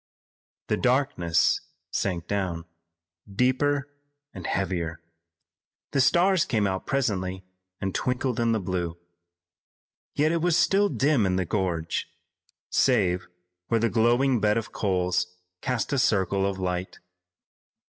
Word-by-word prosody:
The 105 - +2
darkness 125 -11 +2 0.3
sank 90 -4 -1
down, 90 -5 -2 0.7
deeper 135 +6 +1 0.5
and 90 -3 -6
heavier. 85 -4 -2 0.9
The 140 - +2
stars 175 +6 +4
came 110 -8 0
out 95 -1 -2
presently 95 -9 -1 0.4
and 95 -1 -2
twinkled 125 -1 -1
in 115 -1 +2
the 110 - +1
blue. 90 -3 -3 1.2
Yet 155 +2 +2
it 170 -1 0
was 175 -1 +3
still 200 +1 +3
dim 135 - +2
in 90 - +1
the 95 -1 0
gorge, 85 -4 -1 0.6
save 90 0 +2 0.4
where 115 - +2
the 115 +1 +2
glowing 120 +3 +3
bed 105 +1 +2
of 115 - -3
coals 90 -2 -1 0.2
cast 125 0 -1
a 140 - +2
circle 100 -5 +2
of 100 -1 -3
light. 90 0 -3
100 Hz, 125 wpm, -26 LUFS, 90-130 Hz, 1.2 s, stars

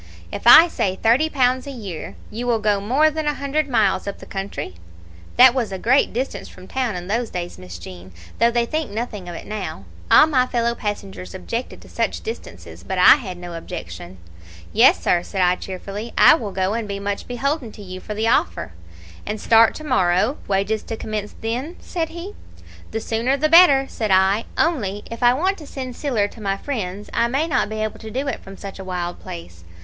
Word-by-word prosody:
If - - -4
I 320 +8 +10
say 190 - -1
thirty 245 +10 +3
pounds 260 -2 +1
a - - -5
year, 200 - -7 0.2
you 235 +3 -4
will 235 -2 +3
go 210 -2 +1
more 275 +9 +3
than 310 0 -3
a 295 - +1
hundred 280 +2 -1
miles 205 -6 +2
up 200 - -4
the - - -12
country?' 195 - -5 0.6
That 250 0 +8
was 240 -6 -1
a 190 - -3
great 250 +8 +3
distance 225 -5 -4
from 185 - -14
town 250 -4 -2
in 175 0 -5
those 225 +5 -1
days, 175 - -6
Miss 90 -2 -9
Jean, 90 +2 -11 0.3
though 235 - +5
they 235 0 +1
think 310 0 -2
nothing 210 -4 -5
of 175 - -7
it - - -8
now. 195 - -5 0.3
All - - +8
my 260 -5 +2
fellow 235 -1 0
passengers 205 -4 -6
objected 230 +6 -5
to - - -15
such - - -2
distances, 450 - -8
but - - -4
I - - +8
had 190 -10 -7
no 175 -1 -8
objection. 95 - -8 0.6
"'Yes, - - +6
sir,' 175 - +3
said 190 +2 -3
I, 180 0 +4
cheerfully, 195 +5 -7
'I - - +8
will 225 -10 -2
go, 190 +1 0
and 225 -1 -3
be 200 -1 -4
much 200 0 -4
beholden 260 0 -2
to 205 - -11
you 185 -1 -8
for 210 +2 -7
the 220 +2 0
offer.' 80 - +1 0.6
"'And 215 0 -3
start 225 +1 +5
to 310 - -8
morrow, 215 -2 +2
wages 200 +2 0
to 225 - -6
commence 210 -2 -5
then?' 250 +9 -3
said 330 -2 -3
he. 345 +4 -8 0.6
"'The 225 - -4
sooner 235 +6 0
the 310 +2 +1
better,' 315 -5 +7
said 220 -5 -3
I. 190 +3 +3
'Only, 210 - 0
if 230 - -7
I 245 0 +5
want 375 +7 0
to 305 - -11
send 255 -3 -6
siller 240 -9 0
to 225 - -14
my 195 -1 -1
friends 205 -5 -5
I 235 - +2
may 275 +6 0
not 285 -8 +1
be 215 0 -3
able 215 - -4
to 220 - -8
do 265 +5 -3
it 270 - -2
from 195 0 -11
such 195 -1 -8
a - - -6
wild 180 -2 -4
place.' 85 0 -10
220 Hz, 215 wpm, -21 LUFS, 195-260 Hz, 0.6 s, I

